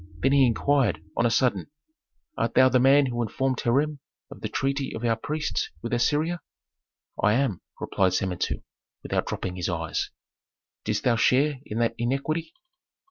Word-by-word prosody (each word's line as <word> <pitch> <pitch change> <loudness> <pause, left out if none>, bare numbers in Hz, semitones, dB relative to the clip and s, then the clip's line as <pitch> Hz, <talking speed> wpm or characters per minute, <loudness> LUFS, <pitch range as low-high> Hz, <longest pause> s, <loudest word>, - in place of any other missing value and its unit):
Then 135 - +4
he 140 -2 +5
inquired, 135 +3 +1
on 120 - +3
a - - +1
sudden 125 +2 +1 0.7
"Art - - -1
thou 130 0 +7
the 130 0 +3
man 135 +3 +6
who 120 -2 -2
informed 130 +3 -1
Hiram 145 +5 +1 0.3
of - - -11
the - - -3
treaty 135 0 -1
of 115 - -6
our 115 -1 +3
priests 150 +6 -2
with 115 - -3
Assyria?" 150 +7 +1 0.8
"I 105 - +4
am," 125 -6 0 0.2
replied 95 -2 +1
Samentu, 90 -2 -2 0.4
without - - -1
dropping 90 -1 -4
his 90 +1 -2
eyes. 80 -2 -2 0.8
"Didst 105 -1 -1
thou 120 -3 +3
share 135 +5 +3
in 105 - -4
that 115 -1 +1
iniquity?" 140 - -1
125 Hz, 160 wpm, -26 LUFS, 115-140 Hz, 0.8 s, thou